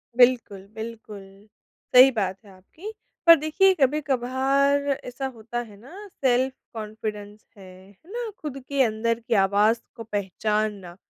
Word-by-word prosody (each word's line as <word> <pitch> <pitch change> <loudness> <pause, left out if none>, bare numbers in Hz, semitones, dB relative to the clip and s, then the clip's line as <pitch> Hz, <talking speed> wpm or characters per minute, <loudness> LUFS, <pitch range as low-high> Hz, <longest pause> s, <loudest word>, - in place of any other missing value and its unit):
बिल्कुल, 240 -6 +3
बिल्कुल। 220 -2 -8 0.7
सही 255 +2 +9
बात 195 -5 -2
है 200 - -15
आपकी। 255 - -11 0.4
पर 335 - +11
देखिए, 330 +6 +3
कभी-कभार 275 0 +1 0.2
ऐसा 250 +2 -6
होता 235 -1 -6
है 215 -4 -9
ना, 370 - -12 0.2
सेल्फ-कॉन्फिडेंस 215 -5 -3
है, 185 -1 -14
है 205 - -20
ना? 475 0 -4
खुद 295 -3 -6
के 280 -1 0
अंदर 230 0 -1
की 230 0 -3
आवाज़ 205 +3 +3 0.2
को 230 - -8
पहचानना। 205 -2 -3
230 Hz, 130 wpm, -24 LUFS, 210-270 Hz, 0.7 s, पर